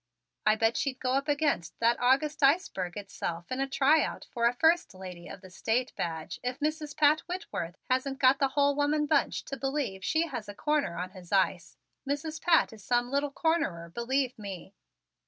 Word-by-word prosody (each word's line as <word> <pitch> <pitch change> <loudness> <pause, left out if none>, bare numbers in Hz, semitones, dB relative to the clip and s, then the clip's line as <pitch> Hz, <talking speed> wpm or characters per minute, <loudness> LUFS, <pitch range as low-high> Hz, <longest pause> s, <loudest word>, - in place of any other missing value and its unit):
I 215 - +6
bet 225 +1 +2
she'd 270 -2 -2
go 255 - -1
up 275 +2 0
against 285 - 0
that 235 +1 +3
august 275 +5 +2
iceberg 275 - +2
itself 175 -3 -5
in 255 - -2
a 275 - 0
try 285 +3 +4
out - - -5
for 235 0 +2
a 240 - +2
'First 325 - +3
Lady 180 -2 -9
of 195 - -9
the 185 -2 -13
State' 235 +7 -1
badge 160 -2 -4
if 250 +2 -3
Mrs. 305 -1 -2
Pat 300 +1 +5
Whitworth 185 - -4
hadn't 260 +1 0
got 270 0 +4
the 275 - +3
whole 285 +1 +2
woman 295 +1 +1
bunch 295 -1 +1
to 275 - -5
believe 270 -9 -2
she 320 +9 +1
has 225 -10 -6
a 205 - -7
corner 295 - 0
on 180 +1 -4
his 185 -3 -13
ice. 190 -3 +1 0.3
Mrs. 310 +2 -3
Pat 330 -8 +4
is 215 -3 -13
some 245 +3 +1
little 280 +1 0
cornerer, 280 - -1
believe 255 +1 -1
me." 195 -2 -8
260 Hz, 190 wpm, -29 LUFS, 200-290 Hz, 0.3 s, I